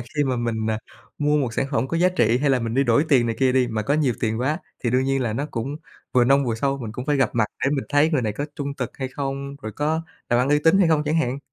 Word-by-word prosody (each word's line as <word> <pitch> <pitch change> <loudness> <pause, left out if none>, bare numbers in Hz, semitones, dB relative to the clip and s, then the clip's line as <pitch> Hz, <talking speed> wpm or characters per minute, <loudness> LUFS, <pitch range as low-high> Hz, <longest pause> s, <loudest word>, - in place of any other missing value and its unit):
khi 145 +5 -2
mà 130 -2 0
mình, 110 -2 -1
à, 110 - -1 0.4
mua 150 0 +2
một 125 -5 -1
sản 135 - 0
phẩm 130 -2 0
có 165 - -1
giá 175 +2 +4
trị 120 -10 +2
hay 140 +1 +1
là 130 - +3
mình 115 0 -3
đi 135 +2 +3
đổi 120 +4 +3
tiền 125 -5 +4
này 115 -1 -2
kia 130 -1 +3
đi, 130 -1 +3
mà 110 -2 -2
có 125 +7 0
nhiều 145 -6 +1
tiền 110 0 -1
quá, 150 +5 0 0.3
thì 120 - +2
đương 130 +2 +2
nhiên 135 0 0
là 115 -3 -1
nó 140 +7 -2
cũng 130 +5 -4 0.4
vừa 125 -1 +4
nông 140 +2 +4
vừa 115 - 0
sâu, 135 +4 -1
mình 115 -5 -6
cũng 125 +3 -6
phải 145 -1 +2
gặp 130 -5 +2
mặt 115 -2 +2 0.2
để 135 - +2
mình 140 -2 -1
thấy 145 +2 +3
người 145 -6 +1
này 110 -2 -1
có 140 +8 -4
trung 140 -1 -4
thực - - -5
hay 130 -2 -3
không, 140 +1 -5
rồi 110 - -5
có 155 +6 -1 0.3
làm 120 - +4
ăn 130 - +1
uy 145 +1 +4
tín 165 +4 +5
hay 185 -4 +4
không 155 -2 +3
chẳng 155 +2 0
hạn. 130 -4 0
135 Hz, 310 wpm, -23 LUFS, 120-145 Hz, 0.4 s, tín